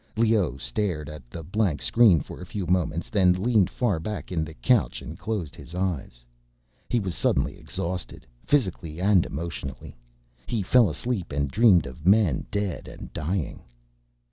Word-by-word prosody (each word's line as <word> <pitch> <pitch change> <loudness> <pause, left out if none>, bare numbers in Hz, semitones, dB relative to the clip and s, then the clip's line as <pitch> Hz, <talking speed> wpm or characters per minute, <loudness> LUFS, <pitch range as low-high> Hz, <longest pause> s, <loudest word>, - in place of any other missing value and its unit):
Leoh 110 - +2
stared 75 - -2
at 75 -5 -10
the 85 +4 -7
blank 90 -3 0
screen 105 - +5
for - - -9
a - - -6
few 100 0 -4
moments, 85 -2 0
then 95 -4 +4
leaned 105 +1 +2
far 105 -10 0
back 105 +5 -5
in 80 -3 0
the 80 0 -8
couch - - +2
and 80 - -9
closed 95 -6 -3
his 80 - -11
eyes. 80 -10 -3 0.6
He 120 - +2
was 95 -4 -3
suddenly - - 0
exhausted, 90 +1 -4 0.2
physically 90 - 0
and 95 -2 +4
emotionally. 75 -3 -6 0.5
He 115 -4 -1
fell 115 +2 +5
asleep, 95 +4 -3
and 70 -1 -1
dreamed 95 - +5
of 70 +6 -7
men 95 - +4
dead 100 -3 -3
and - - -10
dying. 85 0 -2
90 Hz, 160 wpm, -26 LUFS, 75-105 Hz, 0.6 s, screen